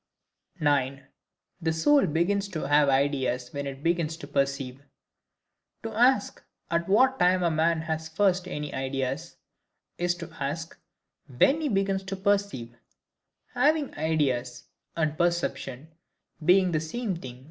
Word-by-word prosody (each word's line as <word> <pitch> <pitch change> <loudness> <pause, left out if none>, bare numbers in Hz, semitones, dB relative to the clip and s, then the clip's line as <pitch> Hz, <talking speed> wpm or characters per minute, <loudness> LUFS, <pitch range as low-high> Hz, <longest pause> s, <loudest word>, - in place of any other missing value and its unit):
9. 140 -3 +1 0.6
The 160 -1 +1
Soul 275 - +4
begins 190 +6 +1
to 155 -7 -4
have 145 0 +4
Ideas 135 -2 0
when 140 0 -3
it 135 +1 -7
begins 165 -1 0
to 165 - -9
perceive. 135 -2 -1 1.0
To 225 -1 -5
ask, 240 -1 +2 0.3
at 170 +1 0
what 260 +6 +4
TIME 180 0 +3
a 170 - +2
man 160 +1 +2
has 160 0 -3
first 185 +1 +1
any 150 -4 -5
ideas, 135 +4 -3 0.6
is 175 0 +1
to 165 -2 -9
ask, 155 +4 -4 0.5
when 270 - +3
he 300 - 0
begins 195 -2 +1
to 195 +1 -4
perceive;—HAVING 200 - -2
IDEAS, 135 -6 -1 0.3
and 155 -2 0
PERCEPTION, 160 -5 -1 0.5
being 185 +2 +4
the 155 - +1
same 190 +6 -3
thing. 125 -7 -9
160 Hz, 130 wpm, -27 LUFS, 140-190 Hz, 1.0 s, Soul